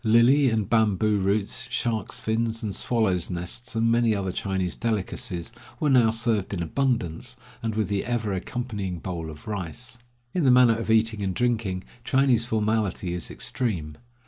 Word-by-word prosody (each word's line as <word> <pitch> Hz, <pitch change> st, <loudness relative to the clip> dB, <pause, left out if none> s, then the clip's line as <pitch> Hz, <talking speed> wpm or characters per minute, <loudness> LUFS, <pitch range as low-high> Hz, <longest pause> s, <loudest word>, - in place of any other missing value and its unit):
Lily 120 Hz, +5 st, +5 dB
and 110 Hz, -3 st, 0 dB
bamboo 110 Hz, -2 st, +2 dB
roots, 100 Hz, +5 st, 0 dB
sharks' 115 Hz, -3 st, -1 dB
fins 115 Hz, 0 st, -1 dB
and 105 Hz, -2 st, -2 dB
swallows' 95 Hz, -6 st, 0 dB
nests, 90 Hz, +8 st, -5 dB
and 115 Hz, +1 st, +2 dB
many 115 Hz, -2 st, +3 dB
other 95 Hz, -2 st, -2 dB
Chinese 95 Hz, -1 st, -1 dB
delicacies, 100 Hz, -3 st, -3 dB, 0.3 s
were 150 Hz, -2 st, +2 dB
now 120 Hz, -4 st, +6 dB
served 110 Hz, -3 st, 0 dB
in 85 Hz, -, -2 dB
abundance, 120 Hz, 0 st, -1 dB, 0.3 s
and 110 Hz, -2 st, -2 dB
with 110 Hz, -1 st, +1 dB
the 100 Hz, -1 st, -1 dB
ever 115 Hz, -4 st, -1 dB
accompanying 100 Hz, -2 st, -3 dB
bowl 85 Hz, -1 st, -5 dB
of 75 Hz, -1 st, -11 dB
rice. 105 Hz, +5 st, -5 dB, 0.3 s
In 180 Hz, -, +1 dB
the 135 Hz, -, +5 dB
matter 125 Hz, -2 st, +7 dB
of 115 Hz, 0 st, -4 dB
eating 110 Hz, -1 st, +3 dB
and 95 Hz, -2 st, -1 dB
drinking, 110 Hz, -7 st, 0 dB, 0.2 s
Chinese 130 Hz, -3 st, +3 dB
formality 110 Hz, -5 st, 0 dB
is 90 Hz, -2 st, -4 dB
extreme. 85 Hz, -, -3 dB
110 Hz, 160 wpm, -26 LUFS, 95-120 Hz, 0.3 s, matter